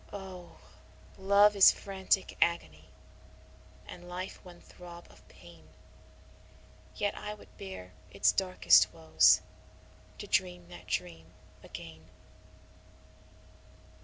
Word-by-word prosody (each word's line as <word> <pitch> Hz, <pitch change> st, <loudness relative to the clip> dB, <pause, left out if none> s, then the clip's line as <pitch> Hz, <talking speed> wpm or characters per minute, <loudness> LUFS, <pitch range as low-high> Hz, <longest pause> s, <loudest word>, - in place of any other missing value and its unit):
Oh! 190 Hz, -3 st, -10 dB, 0.6 s
love 200 Hz, +2 st, +4 dB
is 195 Hz, -, +8 dB
frantic 190 Hz, -1 st, -2 dB
agony, 80 Hz, -, 0 dB, 1.0 s
and 175 Hz, 0 st, -11 dB
life 185 Hz, +2 st, -7 dB
one 175 Hz, -1 st, -14 dB
throb 175 Hz, -1 st, -13 dB
of -, -, -21 dB
pain; 85 Hz, 0 st, -17 dB, 1.3 s
Yet 205 Hz, 0 st, -2 dB
I 210 Hz, 0 st, -6 dB
would 210 Hz, -, -19 dB
bear 190 Hz, -, -9 dB, 0.2 s
its 100 Hz, +2 st, +2 dB
darkest 185 Hz, -, +4 dB
woes 80 Hz, 0 st, +4 dB, 0.8 s
to -, -, -8 dB
dream 90 Hz, -1 st, -1 dB
that -, -, -13 dB
dream 80 Hz, -2 st, -4 dB, 0.3 s
again. 80 Hz, -1 st, -11 dB
175 Hz, 100 wpm, -30 LUFS, -, 1.3 s, is